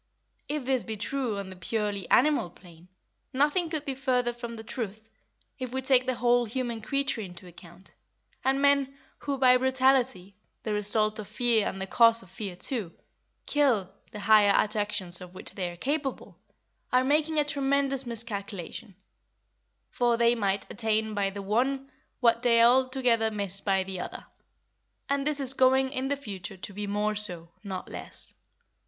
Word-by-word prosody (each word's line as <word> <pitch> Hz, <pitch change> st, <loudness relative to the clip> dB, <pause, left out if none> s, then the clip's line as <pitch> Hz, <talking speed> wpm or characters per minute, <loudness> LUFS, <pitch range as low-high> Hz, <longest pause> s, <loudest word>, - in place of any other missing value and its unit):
If 295 Hz, -3 st, -2 dB
this 260 Hz, -2 st, +1 dB
be 220 Hz, -1 st, -5 dB
true 240 Hz, 0 st, -2 dB
on 195 Hz, -1 st, -6 dB
the -, -, -9 dB
purely 205 Hz, 0 st, -3 dB
animal 285 Hz, -8 st, +4 dB
plane, 175 Hz, -1 st, -17 dB, 0.5 s
nothing 300 Hz, +6 st, +2 dB
could 310 Hz, -2 st, -3 dB
be 275 Hz, -, -2 dB
further 250 Hz, -2 st, 0 dB
from 235 Hz, -1 st, -7 dB
the 220 Hz, -, -8 dB
truth, 220 Hz, -2 st, -6 dB, 0.5 s
if 255 Hz, -2 st, -4 dB
we 260 Hz, +1 st, -3 dB
take 255 Hz, -1 st, +3 dB
the 255 Hz, -, +1 dB
whole 240 Hz, 0 st, +3 dB
human 235 Hz, 0 st, -3 dB
creature 275 Hz, 0 st, -1 dB
into 180 Hz, -2 st, -9 dB
account, 175 Hz, +1 st, -14 dB, 0.5 s
and 270 Hz, +1 st, +2 dB
men 280 Hz, -1 st, +2 dB, 0.2 s
who, 280 Hz, -1 st, -3 dB
by 255 Hz, -1 st, +6 dB
brutality 260 Hz, -6 st, +2 dB, 0.3 s
(the 215 Hz, -, -2 dB
result 215 Hz, +1 st, +1 dB
of 210 Hz, -, -6 dB
fear 230 Hz, 0 st, +2 dB
and 195 Hz, -, -4 dB
the 190 Hz, -, -2 dB
cause 230 Hz, +3 st, +5 dB
of 185 Hz, -, -18 dB
fear, 195 Hz, -2 st, -5 dB
too), 205 Hz, -2 st, 0 dB, 0.5 s
kill 235 Hz, -10 st, +1 dB, 0.2 s
the 210 Hz, -2 st, -8 dB
higher 210 Hz, -1 st, +6 dB
attractions 205 Hz, -4 st, -1 dB
of 180 Hz, 0 st, -11 dB
which -, -, -6 dB
they 180 Hz, -3 st, -3 dB
are 175 Hz, -, -10 dB
capable, 270 Hz, -, -3 dB, 0.5 s
are 255 Hz, 0 st, +4 dB
making 305 Hz, +3 st, +1 dB
a 295 Hz, -, +3 dB
tremendous 275 Hz, -1 st, 0 dB
miscalculation; 210 Hz, -3 st, -6 dB, 1.0 s
for 240 Hz, -1 st, +2 dB
they 235 Hz, 0 st, +4 dB
might 200 Hz, -4 st, -1 dB
attain 220 Hz, 0 st, -1 dB
by 200 Hz, -1 st, 0 dB
the 200 Hz, 0 st, -7 dB
one 265 Hz, +7 st, 0 dB, 0.3 s
what 235 Hz, -1 st, +4 dB
they 235 Hz, -2 st, +4 dB
altogether 250 Hz, -2 st, +3 dB
miss 200 Hz, -2 st, -3 dB
by 195 Hz, -2 st, +1 dB
the 190 Hz, -1 st, -6 dB
other; -, -, -6 dB, 0.8 s
and 280 Hz, 0 st, 0 dB
this 300 Hz, -1 st, +1 dB
is 270 Hz, -1 st, +2 dB
going 265 Hz, 0 st, +3 dB
in 260 Hz, 0 st, -2 dB
the 285 Hz, +1 st, -1 dB
future 195 Hz, -7 st, -7 dB
to 190 Hz, +2 st, -8 dB
be 205 Hz, +1 st, -4 dB
more 210 Hz, +1 st, 0 dB
so, 175 Hz, -5 st, -2 dB
not 190 Hz, -3 st, -5 dB
less. -, -, -3 dB
230 Hz, 170 wpm, -28 LUFS, 200-265 Hz, 1.0 s, by